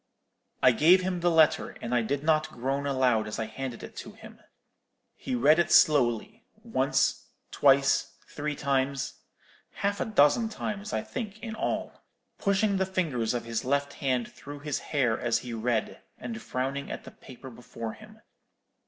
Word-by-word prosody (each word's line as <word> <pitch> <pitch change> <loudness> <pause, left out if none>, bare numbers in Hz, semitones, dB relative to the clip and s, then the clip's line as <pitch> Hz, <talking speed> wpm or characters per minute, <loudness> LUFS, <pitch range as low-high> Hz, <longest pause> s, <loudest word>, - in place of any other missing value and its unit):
"I 130 - +8
gave 165 +10 +5
him 180 -1 -1
the 175 +1 +2
letter; 160 -2 +3
and 120 - -4
I 120 - +3
did 140 +5 -2
not 155 0 +2
groan 135 +3 -2
aloud 125 -5 +2
as 105 - -5
I 115 - -2
handed 120 +2 -6
it - - -10
to - - -8
him. - - -14 0.8
He 125 - -4
read 150 +7 +5
it 170 -1 +1
slowly, 155 - +3 0.2
once, 180 - 0 0.2
twice, 135 -1 +3
three 150 0 -4
times—half 140 +8 -3
a - - +1
dozen 220 +2 +3
times, 210 -1 -5
I - - -1
think, 215 -5 -6
in 225 -2 -5
all—pushing 200 -2 -2
the 190 - +1
fingers 145 -12 -1
of 120 - -3
his 115 -1 -3
left 140 +2 0
hand 130 -3 -2
through 145 0 -10
his 145 -1 -2
hair 125 -7 0
as 115 -1 +1
he 120 0 -6
read, 115 0 -2 0.2
and 115 -2 -6
frowning 135 +2 -3
at - - -6
the - - -11
paper 130 0 -12
before 115 -1 -7
him. 215 0 -15
140 Hz, 160 wpm, -28 LUFS, 125-175 Hz, 0.8 s, I